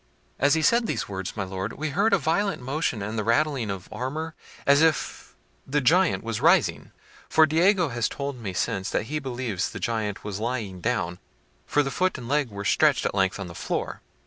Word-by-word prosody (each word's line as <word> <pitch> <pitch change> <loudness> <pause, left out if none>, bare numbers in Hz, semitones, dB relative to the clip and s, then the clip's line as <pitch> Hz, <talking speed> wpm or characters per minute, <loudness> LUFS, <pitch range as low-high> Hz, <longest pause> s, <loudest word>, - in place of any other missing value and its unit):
As 140 +3 +4
he 160 - 0
said 235 +6 +4
these - - -2
words, 95 +1 -5
my 100 - 0
Lord, 95 0 -4
we 155 0 -3
heard 205 +8 +2
a 200 - +5
violent 180 +6 0
motion 130 -4 -2
and 110 +2 -3
the - - -1
rattling 125 0 +1
of 95 -2 -5
armour, 155 +6 -4 0.3
as 140 +2 +5
if 160 -2 0 0.3
the 145 +2 +1
giant 170 +8 +3
was 115 -2 -3
rising, - - +3 0.4
for 160 0 +6
Diego 175 +2 +3
has 120 -2 -1
told 140 -2 -5
me 105 -5 -4
since 95 +1 -1
that - - 0
he 155 - +1
believes 120 -8 -3
the - - -7
giant 110 -3 -2
was 105 -1 -4
lying 110 -6 -3
down, 90 -7 -1 0.5
for 145 - +2
the 135 - -3
foot 185 +5 0
and 120 -3 -8
leg 145 -1 +1
were 100 -1 -7
stretched - - +3
at - - 0
length 95 0 +1
on 100 - -4
the 85 - -9
floor. - - -3
125 Hz, 205 wpm, -25 LUFS, 105-155 Hz, 0.5 s, for